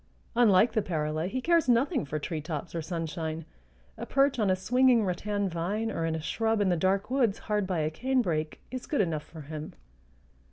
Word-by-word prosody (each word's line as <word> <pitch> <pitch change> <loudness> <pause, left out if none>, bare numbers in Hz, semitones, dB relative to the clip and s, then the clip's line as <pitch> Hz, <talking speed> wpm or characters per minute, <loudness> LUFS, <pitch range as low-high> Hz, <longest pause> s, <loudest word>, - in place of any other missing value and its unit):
Unlike 225 -2 +5
the 220 - +2
parula, 155 -2 -2
he 255 +7 -3
cares 335 -2 +3
nothing 255 - +2
for 145 +2 -3
treetops 155 -1 -4
or 165 - -2
sunshine; 165 -1 -4 0.5
a - - -5
perch 275 -1 +2
on 210 -3 +2
a 185 - +4
swinging 245 +3 +3
rattan 200 +2 -1
vine 195 +6 -2
or 165 -4 -1
in 160 - -1
a - - -2
shrub 225 +7 0
in 200 -2 +2
the 175 - +3
dark 190 +6 0
woods 245 -7 +2
hard 210 -2 -1
by 180 -4 0
a 155 0 0
canebrake 175 -8 -1
is 255 -1 -6
good 290 - -1
enough 165 -5 -1
for 160 - -10
him. 155 +1 -7
190 Hz, 195 wpm, -29 LUFS, 160-235 Hz, 0.5 s, Unlike